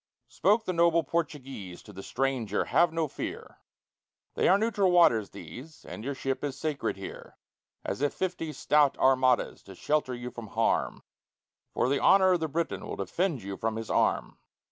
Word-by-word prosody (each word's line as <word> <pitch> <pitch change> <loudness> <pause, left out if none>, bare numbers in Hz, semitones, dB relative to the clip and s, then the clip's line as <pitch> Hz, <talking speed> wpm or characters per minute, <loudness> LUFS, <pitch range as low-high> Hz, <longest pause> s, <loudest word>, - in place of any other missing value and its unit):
Spoke 220 +2 +2
the 185 - -1
noble 170 -1 +3
Portuguese 135 - -4
to 105 - -13
the 95 - -8
stranger: 125 -4 -1
"Have 170 -1 +3
no 165 -1 -1
fear; - - -7 0.7
They - - +1
are 190 - +6
neutral 205 -3 +1
waters 120 - +4
these, 125 - -11
and 105 - -8
your 140 +2 -3
ship 135 +1 -3
is 140 -2 -3
sacred 150 -7 -2
here 95 - -9 0.5
As - - -3
if 145 - +2
fifty 180 -4 -3
stout 150 0 +2
armadas 130 -1 +2
to 95 - -13
shelter 145 +2 0
you 120 0 -6
from 120 -2 -8
harm, - - 0 0.7
For - - +2
the 140 +1 +1
honor 190 -1 +5
of 180 - +3
the 160 - -1
Briton 165 +3 -3
will - - -4
defend 170 - -2
you 100 0 -6
from 115 0 -2
his 110 0 -5
arm." - - 0
140 Hz, 175 wpm, -28 LUFS, 120-170 Hz, 0.7 s, are